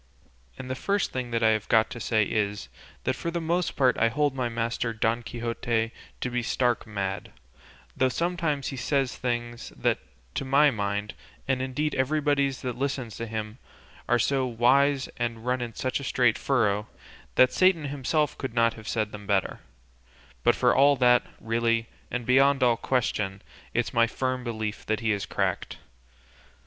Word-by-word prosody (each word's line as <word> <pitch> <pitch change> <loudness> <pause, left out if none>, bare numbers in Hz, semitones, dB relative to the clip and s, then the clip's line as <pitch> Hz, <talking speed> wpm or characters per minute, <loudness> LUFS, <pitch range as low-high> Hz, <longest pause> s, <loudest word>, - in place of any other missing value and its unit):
And 125 - -7
the 130 - -2
first 200 +9 0
thing 125 -2 -4
I 115 -1 +4
have 110 -1 0
got 110 -1 +4
to 120 - -6
say 110 -2 +2
is, 100 - -2 0.3
that 130 - 0
for 170 - -4
my 165 0 -1
own 180 +1 +2
part 130 -4 +3
I 115 - +4
hold 145 +3 +1
my 125 -3 -1
master 115 0 -2
Don 115 +2 0
Quixote 115 -1 -2 0.3
to 125 - -1
be 125 0 0
stark 120 0 0
mad, 100 -2 -4 0.6
though 130 - +2
sometimes 165 -2 -1
he 135 - -6
says 135 0 0
things 120 -1 -3
that, - - +1 0.3
to - - -2
my 140 +2 +4
mind, 100 -1 -2 0.3
and 130 -1 +1
indeed 145 +4 -1
everybody's 140 0 +1
that 125 -1 -4
listens 130 -4 -2
to 115 - -4
him, 110 +1 -5 0.5
are 120 - +5
so 135 +3 +1
wise, 130 +4 +3
and 120 -1 -3
run 125 0 0
in 115 -2 -5
such 130 +1 -1
a - - -7
straight 125 -3 +2
furrow, 105 -6 +1 0.5
that 130 0 +5
Satan 185 -5 +3
himself 145 +1 0
could 130 -4 -4
not 115 -1 +3
have 110 -1 -12
said 110 -2 -1
them 105 -1 -9
better; 100 -2 0 0.8
but - - +4
for - - +3
all 140 +1 +6
that, 125 -1 +5 0.2
really, 115 0 0 0.2
and 125 -1 -3
beyond 135 +2 +4
all 120 -2 +4
question, 105 -6 -1 0.3
it's - - 0
my 115 0 +4
firm 130 +1 -2
belief 110 -3 -4
he 110 0 0
is 100 -2 -2
cracked. - - -2
120 Hz, 170 wpm, -27 LUFS, 115-135 Hz, 0.8 s, all